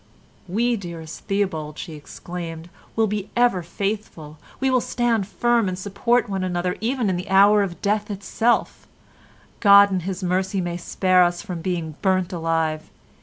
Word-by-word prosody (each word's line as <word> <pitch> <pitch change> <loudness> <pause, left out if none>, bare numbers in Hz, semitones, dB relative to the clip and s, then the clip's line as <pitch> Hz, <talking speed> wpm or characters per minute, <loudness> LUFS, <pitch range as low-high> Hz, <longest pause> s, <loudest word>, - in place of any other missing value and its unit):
"We, 235 +6 +1
dearest 170 -4 -8
Theobald," 185 -7 -2
she 165 - -7
exclaimed, 165 +2 -8 0.2
"will 225 - +3
be 210 -1 -3
ever 240 -7 +3
faithful. 170 -5 -5 0.2
We 265 0 +1
will 255 -1 +3
stand 230 -6 0
firm 230 +3 +1
and 180 - -4
support 210 +6 0
one 195 -2 -2
another 180 0 -1
even 240 0 0
in 185 -2 0
the 180 +3 -6
hour 200 +2 +6
of 185 -4 -4
death 210 +1 0
itself. 210 +4 -1 0.7
God 200 -1 +7
in 190 - +1
his 185 +2 -5
mercy 190 +2 0
may 175 -1 -2
spare 185 +1 +3
us 175 +1 0
from 180 -5 -6
being 165 -4 -3
burnt 185 -2 +1
alive. 165 -2 -1
190 Hz, 160 wpm, -23 LUFS, 175-210 Hz, 0.7 s, God